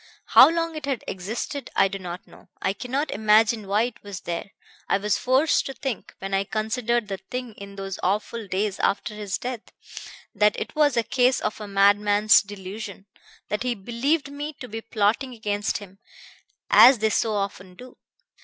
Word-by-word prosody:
How - - +9
long 330 0 -1
it 300 -2 -6
had 265 -5 -2
existed 225 +8 -5
I - - +5
do 195 0 -6
not 180 -1 -7
know. - - -18
I 190 - 0
cannot 260 +8 -3
imagine 215 0 +3
why 205 +3 +2
it 245 -1 -5
was 200 -3 -8
there. 170 +3 -4 0.4
I - - +3
was 210 +1 0
forced 265 +5 +2
to 270 - -6
think, 255 -5 -5
when 195 0 -6
I 195 0 +2
considered 220 +2 -1
the 195 -2 -4
thing 250 -2 -5
in 200 -1 -11
those 195 -1 -6
awful 210 +3 -2
days 195 +1 -1
after 200 +2 0
his 210 -2 -4
death, 245 -2 -5 0.7
that 210 +1 +2
it - - -6
was 295 -4 +3
a 235 - +3
case 250 +2 +2
of 215 - -3
a 210 - -6
madman's 205 +1 +4
delusion, 200 0 -8 0.4
that 210 - -2
he 250 -1 -1
believed 265 +9 -1
me 295 +2 -5
to 255 - -10
be 225 0 -6
plotting 225 +4 0
against 210 -2 -2
him, 195 -1 -13 0.7
as 260 0 +9
they 220 0 +1
so 220 0 +1
often 190 -2 -4
do. 250 +5 -13
215 Hz, 180 wpm, -24 LUFS, 200-250 Hz, 0.7 s, How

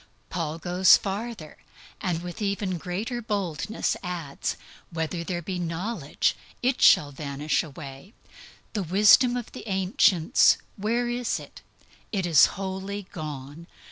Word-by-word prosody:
Then - - -28 0.2
Paul 165 -2 -2
goes 180 +3 +5
farther, 200 -4 -5 0.4
and 175 -4 -1
with 175 +3 -7
even 200 -3 -1
greater 210 +9 -3
boldness 200 -3 -2
adds, 170 -6 -4 0.3
"Whether 165 0 -3
there 175 0 -4
be 185 +1 -4
knowledge, 170 -1 -1 0.3
it 255 +1 +1
shall 145 -1 +6
be 140 +2 -9
done 140 +1 -5 0.2
away." 140 - -10 0.6
The 210 - -1
wisdom 210 +8 +5
of 240 - -6
the - - -10
ancients, 190 -3 +4 0.2
where 230 +4 0
is 240 0 -1
it? - - -13 0.5
It 195 -4 -1
is 165 -5 +7
wholly 195 +1 -4
gone. 150 -1 -7
185 Hz, 135 wpm, -26 LUFS, 160-205 Hz, 0.6 s, is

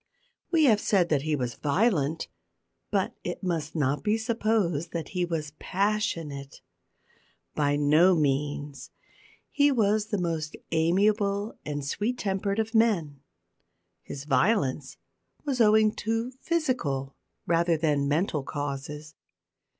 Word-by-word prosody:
We 330 -3 +3
have 225 -7 +5
said 180 -4 +2
that 150 -3 +2
he 155 +1 0
was 125 -3 -2
violent, 160 - 0 0.6
but - - 0
it - - -5
must 165 -4 -2
not 145 -2 0
be 215 +1 +2
supposed 215 -8 0
that 165 -3 -4
he 180 -2 -1
was 155 -4 -4
passionate. 175 -9 -2 0.9
By 145 -1 +1
no 155 +6 +5
means. 145 -2 -1 0.6
He 290 0 +4
was 215 -3 +2
the 210 - -1
most 165 -4 -2 0.2
amiable 200 +5 +1
and 145 -1 -3
sweet 215 - -2
tempered 200 -1 -1
of 220 0 -1
men. 190 -11 +2 0.8
His 140 - -8
violence 140 - +1 0.5
was 265 -4 0
owing 215 0 +5
to 225 +3 -1
physical 170 - -1 0.3
rather 170 0 +2
than 150 -3 +1
mental 150 +1 0
causes. 145 +2 -5
170 Hz, 120 wpm, -27 LUFS, 145-215 Hz, 0.9 s, have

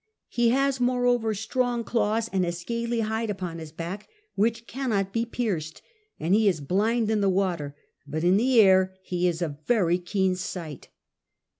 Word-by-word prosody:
He 240 -1 +2
has 275 +2 +1
moreover 245 -3 +1
strong 240 +3 -1
claws 225 -1 0
and 190 -1 +2
a 175 - 0
scaly 235 +7 -2
hide 220 +1 -2
upon 180 -4 -4
his 160 -2 -8
back 170 +6 -6 0.2
which 230 +3 0
cannot 220 -7 -2
be 230 0 0
pierced; 185 -11 -3 0.4
and 165 +4 0
he 215 +1 +4
is 180 -5 +2
blind 215 - +1
in 215 -2 +1
the 200 - +3
water, 175 -7 -1 0.3
but 155 +3 -3
in 180 +2 +4
the 245 +2 +3
air 190 -2 +5
he 180 -1 0
is 175 0 -1
of 160 - -2
a 145 - -13
very 180 -7 +3
keen 190 +1 0
sight. 175 -5 -6
200 Hz, 175 wpm, -26 LUFS, 175-230 Hz, 0.4 s, air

